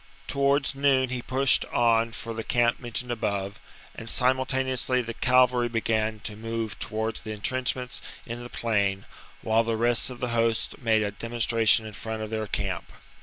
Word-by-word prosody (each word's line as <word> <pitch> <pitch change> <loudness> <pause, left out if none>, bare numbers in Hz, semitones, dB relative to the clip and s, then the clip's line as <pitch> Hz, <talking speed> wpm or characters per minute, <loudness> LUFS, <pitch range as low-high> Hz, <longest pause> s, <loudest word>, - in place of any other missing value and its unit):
Towards 140 0 +1
noon 135 -2 +2
he 125 -1 -3
pushed 130 +2 +3
on 115 -1 +2
for 115 0 -6
the 115 0 -4
camp 120 0 +1
mentioned 120 0 -2
above; 100 -3 -3 0.3
and 115 - -9
simultane 130 +1 +2
ously 130 0 +2
the 115 0 -5
cavalry 125 0 +3
began 110 -1 -1
to 105 - -4
move 115 -1 -4
towards 110 +1 -3
the 110 - -6
entrenchments 125 +3 -1 0.2
in 120 0 -6
the 120 - -8
plain, 100 -5 -1 0.4
while 110 +1 +2
the 115 -1 -1
rest 120 +2 +3
of 125 -1 -9
the 125 - -2
host 115 +1 0
made 110 -4 +2
a 100 - -2
demonstration 115 0 +3
in 110 - -8
front 110 +1 -5
of 110 - -7
their 110 -1 -2
camp. 95 -3 -3
115 Hz, 170 wpm, -26 LUFS, 110-125 Hz, 0.4 s, pushed